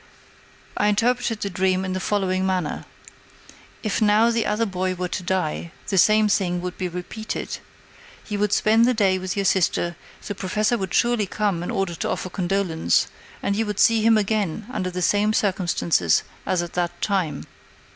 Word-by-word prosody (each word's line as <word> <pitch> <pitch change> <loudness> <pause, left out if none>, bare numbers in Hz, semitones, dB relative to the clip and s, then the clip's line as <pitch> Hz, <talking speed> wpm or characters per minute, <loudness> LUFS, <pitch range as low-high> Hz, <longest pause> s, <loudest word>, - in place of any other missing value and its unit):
I 210 - +2
interpreted 230 +1 +1
the 200 - -1
dream 185 +1 +1
in 185 - -3
the 185 - -2
following 190 -1 0
manner: 185 -5 -1 1.0
"If 215 0 -1
now 215 +2 +4
the 230 -1 0
other 210 +2 +1
boy 185 -2 -2
were 180 0 -3
to - - -3
die, 175 -2 -2 0.2
the 195 - 0
same 215 +3 +5
thing 180 -3 +1
would 180 0 -5
be 185 - -3
repeated. 180 +5 -5 0.7
You 210 -2 -3
would 210 -1 +1
spend 220 +2 +4
the 250 0 +2
day 190 -3 +2
with 185 -1 -4
your 200 -1 -1
sister, 175 -2 +1 0.3
the 205 - -3
Professor 210 +4 0
would 190 -4 -3
surely 235 -4 +2
come 200 -4 -1
in 175 - -4
order 195 -3 -1
to - - -3
offer 185 - -3
condolence, 180 - +1 0.3
and 200 - 0
you 220 +1 0
would 210 -2 -3
see 230 -1 +5
him 225 0 +5
again 210 -2 -1
under 185 -8 -2
the 180 0 -3
same 210 +3 +2
circumstances 175 - +1 0.2
as 180 -2 +1
at 170 - -8
that 175 -1 -2
time. 180 -8 -1
195 Hz, 180 wpm, -23 LUFS, 180-215 Hz, 1.0 s, same